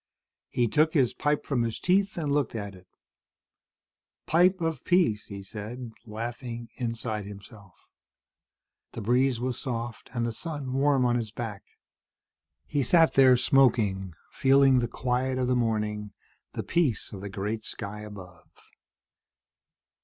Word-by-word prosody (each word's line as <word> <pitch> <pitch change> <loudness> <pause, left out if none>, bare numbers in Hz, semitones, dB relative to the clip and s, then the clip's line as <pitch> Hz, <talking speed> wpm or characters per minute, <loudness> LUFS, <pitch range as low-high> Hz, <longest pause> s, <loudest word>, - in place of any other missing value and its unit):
He 120 - +1
took 155 +6 +2
his 130 -5 +3
pipe 145 0 0
from 135 -4 0
his 115 -1 -2
teeth 190 +2 +2
and 150 -4 -1
looked 140 -5 0
at 100 -2 -4
it. 90 -1 -16 1.4
"Pipe 180 +3 +4
of 165 -5 -2
peace," 170 - +2
he 100 -1 -8
said, 115 +4 -7 0.2
laughing 115 +1 -6
inside 115 -3 -3
himself. 100 -1 -13 1.1
The - - -5
breeze 125 +3 +2
was 125 0 -2
soft 120 -3 -5
and 120 -2 -1
the 115 - -2
sun 145 -1 -5
warm 135 -1 +3
on 120 0 +2
his 115 -2 -3
back. 110 -3 -6 1.0
He 145 - -1
sat 165 +5 +4
there, 130 -2 +6
smoking, 110 - +2 0.2
feeling 135 -1 +5
the 120 - 0
quiet 130 +2 -1
of 130 -1 0
the 125 - +2
morning, 105 -3 -1 0.4
the - - -3
peace 155 -13 0
of 95 - -7
the 100 - -5
great 105 +3 -3
sky 105 +1 -6
above. 95 -5 -11
120 Hz, 140 wpm, -27 LUFS, 105-135 Hz, 1.4 s, there